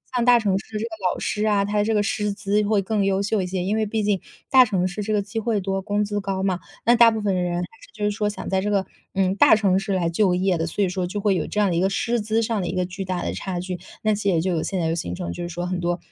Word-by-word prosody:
像 240 Hz, -, +2 dB
大 245 Hz, -1 st, +6 dB
城 195 Hz, -3 st, +1 dB
市 195 Hz, +3 st, -9 dB
这 -, -, -3 dB
个 230 Hz, -, -3 dB, 0.2 s
老 -, -, -7 dB
师 210 Hz, +1 st, -1 dB
啊， 205 Hz, -2 st, +3 dB
它 205 Hz, 0 st, +1 dB
这 220 Hz, +1 st, 0 dB
个 210 Hz, -, +3 dB
师 210 Hz, 0 st, -1 dB
资 205 Hz, +1 st, 0 dB
会 205 Hz, -1 st, +2 dB
更 205 Hz, +1 st, 0 dB
优 195 Hz, 0 st, +1 dB
秀 205 Hz, 0 st, 0 dB
一 180 Hz, -, -2 dB
些， 180 Hz, -1 st, -2 dB
因 205 Hz, +3 st, 0 dB
为 220 Hz, -1 st, +1 dB
毕 215 Hz, +1 st, -1 dB
竟， 200 Hz, -2 st, +1 dB, 0.3 s
大 260 Hz, -1 st, +8 dB
城 185 Hz, -4 st, 0 dB
市 200 Hz, +3 st, -4 dB
这 215 Hz, -, -3 dB
个 205 Hz, -, +2 dB
机 220 Hz, +3 st, -4 dB
会 220 Hz, -2 st, 0 dB
多、 195 Hz, 0 st, -2 dB
工 205 Hz, +1 st, 0 dB
资 205 Hz, 0 st, -2 dB
高 195 Hz, -1 st, -2 dB
嘛， 185 Hz, -2 st, 0 dB, 0.3 s
那 240 Hz, +1 st, +6 dB
大 230 Hz, -1 st, +7 dB
部 220 Hz, -, -2 dB
分 200 Hz, -2 st, 0 dB
人 175 Hz, -1 st, -1 dB
还 -, -, -1 dB, 0.2 s
是 -, -, -15 dB
就 210 Hz, -1 st, -6 dB
是 -, -, +3 dB
说 210 Hz, 0 st, -1 dB
想 205 Hz, -2 st, -6 dB
在 190 Hz, 0 st, +1 dB
这 210 Hz, -, -1 dB
个， 195 Hz, -2 st, +1 dB, 0.3 s
嗯， 190 Hz, 0 st, +1 dB
大 210 Hz, -, +6 dB
城 195 Hz, -3 st, +2 dB
市 195 Hz, 0 st, -2 dB
来 175 Hz, -3 st, +1 dB
就 180 Hz, +1 st, +2 dB
业 185 Hz, -1 st, +1 dB
的， 165 Hz, -, -1 dB
所 200 Hz, +5 st, -1 dB
以 185 Hz, -, +1 dB
说 180 Hz, -1 st, -2 dB
就 205 Hz, +3 st, -4 dB
会 200 Hz, -2 st, +2 dB
有 160 Hz, -, -1 dB
这 210 Hz, -, -2 dB
样 205 Hz, -2 st, +3 dB
的 170 Hz, -, 0 dB
一 -, -, +2 dB
个 190 Hz, +1 st, +2 dB
师 235 Hz, +3 st, 0 dB
资 220 Hz, +2 st, 0 dB
上 225 Hz, -2 st, -1 dB
的 175 Hz, -, -3 dB
一 180 Hz, -, -3 dB
个 180 Hz, -1 st, +1 dB
巨 190 Hz, +1 st, -6 dB
大 180 Hz, -1 st, -2 dB
的 -, -, -2 dB
差 185 Hz, -2 st, -4 dB
距。 180 Hz, -1 st, -5 dB, 0.2 s
那 215 Hz, -1 st, +2 dB
其 210 Hz, -, -5 dB
实 200 Hz, -, +2 dB
也 165 Hz, -3 st, +2 dB
就 185 Hz, +1 st, 0 dB
有 165 Hz, -2 st, 0 dB
现 190 Hz, -2 st, -2 dB
在 165 Hz, -, 0 dB
有 165 Hz, -, 0 dB
形 90 Hz, -, -4 dB
成， 85 Hz, -, -4 dB
就 175 Hz, -, -5 dB
是 175 Hz, -, -4 dB
说 175 Hz, +1 st, -4 dB
很 180 Hz, 0 st, -2 dB
多， 175 Hz, 0 st, -1 dB
195 Hz, 355 characters per minute, -23 LUFS, 185-210 Hz, 0.3 s, 大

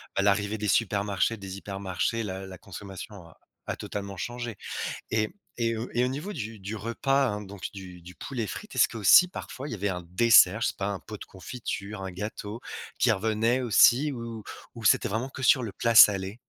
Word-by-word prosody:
bah 100 Hz, -, +2 dB
l'arrivée 100 Hz, +2 st, +1 dB
des 105 Hz, 0 st, -3 dB
supermarchés, 100 Hz, +1 st, +1 dB
des 95 Hz, -1 st, -7 dB
hypermarchés, 100 Hz, +3 st, -2 dB
la 95 Hz, -1 st, -5 dB
la 95 Hz, -1 st, -10 dB
consommation 100 Hz, +2 st, -9 dB
a 80 Hz, -, -19 dB, 0.3 s
a -, -, -3 dB
totalement 100 Hz, -1 st, -6 dB
changé 120 Hz, 0 st, -5 dB, 0.5 s
et 110 Hz, -1 st, +1 dB, 0.3 s
et 115 Hz, -1 st, +1 dB, 0.2 s
et 120 Hz, +1 st, +3 dB
au -, -, +1 dB
niveau 150 Hz, +11 st, -4 dB
du 115 Hz, -, -6 dB
du 100 Hz, +3 st, -5 dB
repas 135 Hz, +5 st, +1 dB
hein, 105 Hz, 0 st, -3 dB
donc 100 Hz, -2 st, -11 dB
du 90 Hz, -2 st, -10 dB
du 90 Hz, +1 st, -12 dB
poulet 120 Hz, -6 st, -4 dB
frites, 210 Hz, -, -8 dB
est-ce -, -, +4 dB
qu'aussi 115 Hz, -, +6 dB
parfois 145 Hz, -6 st, -7 dB
il -, -, -6 dB
y -, -, -2 dB
avait 100 Hz, 0 st, -2 dB
un 90 Hz, -1 st, -4 dB
dessert, 110 Hz, 0 st, +6 dB
je -, -, +3 dB
sais -, -, -3 dB
pas 100 Hz, 0 st, -1 dB
un 100 Hz, -2 st, -3 dB
pot 110 Hz, -, -9 dB
de -, -, -8 dB
confiture, 100 Hz, -1 st, -6 dB
un 95 Hz, -, -4 dB
gâteau, 105 Hz, +4 st, -6 dB, 0.4 s
qui 120 Hz, -, +4 dB
revenait 110 Hz, +4 st, +1 dB
aussi 125 Hz, +5 st, +5 dB
ou 115 Hz, -3 st, -6 dB, 0.3 s
ou 115 Hz, -2 st, -9 dB
c'était -, -, +4 dB
vraiment 115 Hz, +6 st, -2 dB
que 130 Hz, -, -8 dB
sur 130 Hz, 0 st, +5 dB
le 110 Hz, -, -5 dB
plat 115 Hz, +3 st, 0 dB
salé? 100 Hz, -2 st, +7 dB
105 Hz, 205 wpm, -27 LUFS, 100-115 Hz, 0.5 s, salé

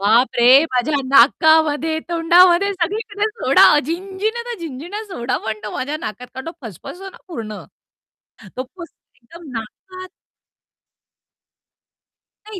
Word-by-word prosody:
बापरे! 240 Hz, +6 st, +5 dB
माझ्या 255 Hz, +4 st, 0 dB
नाकामध्ये, 315 Hz, +4 st, +4 dB
तोंडामध्ये 345 Hz, +3 st, +4 dB
सगळीकडे 410 Hz, +3 st, -2 dB
सोडा! 425 Hz, -8 st, +4 dB
झिणझिण्या 385 Hz, -, -4 dB
त्या 475 Hz, -2 st, -7 dB
झिणझिण्या, 335 Hz, +8 st, -7 dB
सोडा 370 Hz, -, -3 dB
पण 215 Hz, -1 st, -4 dB
तो 210 Hz, -, -5 dB
माझ्या 290 Hz, +4 st, -3 dB
नाकात, 250 Hz, -4 st, -7 dB
कारण 265 Hz, +2 st, -8 dB
तो 330 Hz, -, -5 dB
फसफसतो 355 Hz, -, -10 dB
ना -, -, -17 dB
पूर्ण, 220 Hz, -10 st, -7 dB, 0.9 s
तो 255 Hz, -, -2 dB
फसफसून 335 Hz, +6 st, -15 dB
एकदम 330 Hz, +5 st, -13 dB
नाकात 370 Hz, -, -11 dB, 2.4 s
नाही 425 Hz, -3 st, -8 dB
325 Hz, 115 wpm, -19 LUFS, 255-380 Hz, 2.4 s, बापरे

